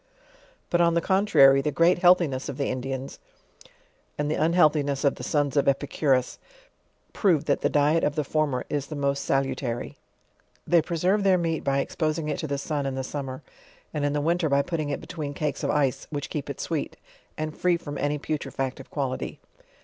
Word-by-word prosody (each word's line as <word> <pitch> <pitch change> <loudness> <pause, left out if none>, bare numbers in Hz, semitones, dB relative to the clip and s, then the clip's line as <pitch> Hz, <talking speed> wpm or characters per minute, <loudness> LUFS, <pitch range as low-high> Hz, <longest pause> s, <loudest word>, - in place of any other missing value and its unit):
But 175 - +3
on 170 -1 +3
the - - +4
con 190 +4 +1
trary, 135 -8 +6
the 150 - 0
great 170 +4 +3
healthiness 175 -7 +3
of 135 - -5
the 140 - -1
Indians, 130 +1 -4 1.0
and 150 0 -1
the - - +1
unhealth 160 -1 +4
iness 140 -1 -1
of 140 - +4
the - - -9
sons 145 -2 0
of 140 - +2
Epicurus, 135 -1 +1 0.7
prove, 175 -8 +2
that - - +1
the 145 - +2
diet 150 +3 +2
of 145 - +1
the 150 - 0
former 145 -3 -1
is 145 -2 -2
the 155 - -6
most 140 -1 -1
salutary. 130 -3 -2 0.7
They 170 -1 +4
preserve 180 +6 0
their 190 -2 +4
meat 165 -3 -1
by 140 0 +1
exposing 155 +2 -1
it - - -2
to 155 - -3
the 140 -1 -2
sun 145 0 -2
iq 135 -1 -2
the 130 - -3
summer, 135 0 -5 0.5
and 150 -2 -2
in 145 0 +1
the 150 - 0
winter 165 +1 +1
by 140 0 +3
putting 155 -3 -3
it 145 - -3
between. 155 -5 -6
cakes 150 0 -2
of - - 0
ice, 140 -2 0
which 145 -2 -5
keep 150 -3 -4
it - - -6
sweet, - - -3 0.4
and 155 0 -4
free 180 -1 +2
from 145 -4 -7
any 145 +1 0
putre 150 +1 -4
factive 135 0 -4
quality. 135 -3 -3
145 Hz, 200 wpm, -26 LUFS, 140-160 Hz, 1.0 s, trary